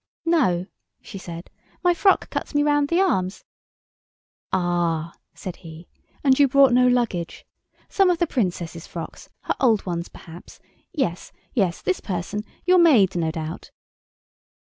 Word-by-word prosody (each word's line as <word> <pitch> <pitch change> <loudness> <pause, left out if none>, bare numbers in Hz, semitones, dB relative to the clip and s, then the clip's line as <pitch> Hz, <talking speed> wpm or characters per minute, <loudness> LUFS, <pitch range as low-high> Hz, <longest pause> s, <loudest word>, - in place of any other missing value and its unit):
"No," 250 - +2 0.3
she 195 - -10
said, 170 -1 -9 0.3
"my 355 -1 +4
frock 385 +3 +2
cuts - - -4
me 290 - +3
round 290 -1 +2
the 340 +4 +1
arms——" 190 - 0 1.1
"Ah," 175 -3 0 0.2
said 185 - -7
he, 165 0 -12 0.4
"and 270 -1 +4
you 285 - +6
brought 270 -1 +5
no 250 +1 +5
luggage—some 245 - -1
of 355 - +2
the 345 - +2
Princess's 175 - -3
frocks—her 165 -2 -6
old 230 -6 +3
ones 170 -2 -3
perhaps—yes—yes—this 185 - -4
person—your 210 - -1
maid, 240 - +5
no 165 -2 0
doubt?" 160 0 -6
195 Hz, 120 wpm, -23 LUFS, 175-290 Hz, 1.1 s, you